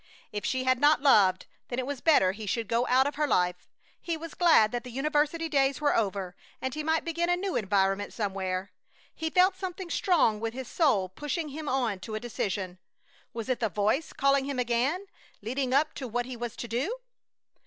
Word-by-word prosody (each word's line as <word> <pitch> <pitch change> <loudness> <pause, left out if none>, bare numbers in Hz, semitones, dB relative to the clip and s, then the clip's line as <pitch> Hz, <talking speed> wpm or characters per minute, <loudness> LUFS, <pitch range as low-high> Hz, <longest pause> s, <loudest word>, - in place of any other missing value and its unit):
If 205 -1 -4
she 260 0 -1
had 255 -1 +2
not 290 0 +4
loved, 195 -9 +5 0.2
then 245 - -4
it 255 - -1
was 280 -1 -5
better 240 - +4
he 210 +2 -8
should 225 +2 -1
go 235 +3 +1
out 260 +1 +4
of 285 - -1
her 300 0 +1
life! 180 -7 0 0.3
He 335 -2 -2
was 330 0 -8
glad 315 -12 +5
that 240 -1 -3
the 250 - -9
university 300 +5 0
days 275 -3 +1
were 295 -1 +2
over, 195 -4 -1 0.2
and 260 -1 -3
he 305 - -3
might 320 +1 0
begin 335 +1 -1
a 355 - +4
new 380 0 -3
environment 195 0 +1
somewhere. 190 -2 -3 0.4
He 320 0 -3
felt 370 +3 +4
something 370 -2 -6
strong 310 - +2
within 225 +2 -4
his 260 -2 -5
soul 240 - +2
pushing 295 - -4
him 300 +1 -5
on 240 -7 0
to 215 +3 -6
a - - -2
decision. 195 -5 -4 0.5
Was 230 -2 -6
it 255 -2 0
the 225 - 0
Voice 210 - 0
calling 275 0 +2
him 280 -1 -3
again, 250 +10 0 0.3
leading 255 +4 -2
up 295 +4 +2
to 260 - -6
what 245 +1 -2
he 255 0 -6
was 235 -1 -5
to 240 - -6
do? 265 - -2
255 Hz, 205 wpm, -28 LUFS, 215-300 Hz, 0.5 s, loved